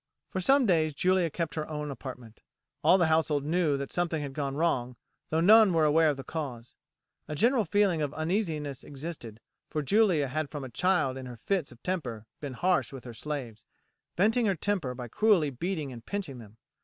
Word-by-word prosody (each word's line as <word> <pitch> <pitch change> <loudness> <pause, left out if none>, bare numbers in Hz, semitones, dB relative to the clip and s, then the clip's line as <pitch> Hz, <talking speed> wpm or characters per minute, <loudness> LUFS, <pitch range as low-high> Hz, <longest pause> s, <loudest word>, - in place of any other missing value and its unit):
For 185 - -2
some 270 +7 +4
days 160 -6 +2
Julia 185 0 +2
kept 160 -1 -3
her 155 +1 -4
own 150 -1 -4
apartment. 125 -4 -9 0.4
All 185 - +6
the 175 - +3
household 160 -3 +1
knew 160 -2 +1
that 140 0 -5
something 175 -2 0
had 140 -2 -6
gone 140 -1 -3
wrong, 130 -6 0 0.3
though 160 +1 +1
none 210 +1 +7
were 160 -2 +3
aware 155 +1 +4
of 145 - -1
the 135 - -6
cause. 125 -6 -6 0.5
A 150 - -4
general 235 - +3
feeling 190 -3 +2
of 145 -2 -1
uneasiness 155 -5 -2
existed, 140 -6 -8 0.3
for 150 - -2
Julia 185 -4 +3
had 155 +2 -2
from 145 -3 -6
a 130 - -6
child 155 -4 +1
in 130 -1 -7
her 120 -1 -9
fits 180 - -1
of 120 - -17
temper 125 - -3
been 145 -3 -5
harsh 170 -2 +1
with 135 -3 -9
her 120 - -8
slaves, 120 -3 -5 0.5
venting 225 +5 +3
her 195 - +2
temper 165 -7 -1
by 125 -1 -6
cruelly 175 - +3
beating 155 +1 -3
and 115 -2 -10
pinching 175 -9 -5
them. 110 -1 -14
155 Hz, 195 wpm, -29 LUFS, 135-180 Hz, 0.5 s, none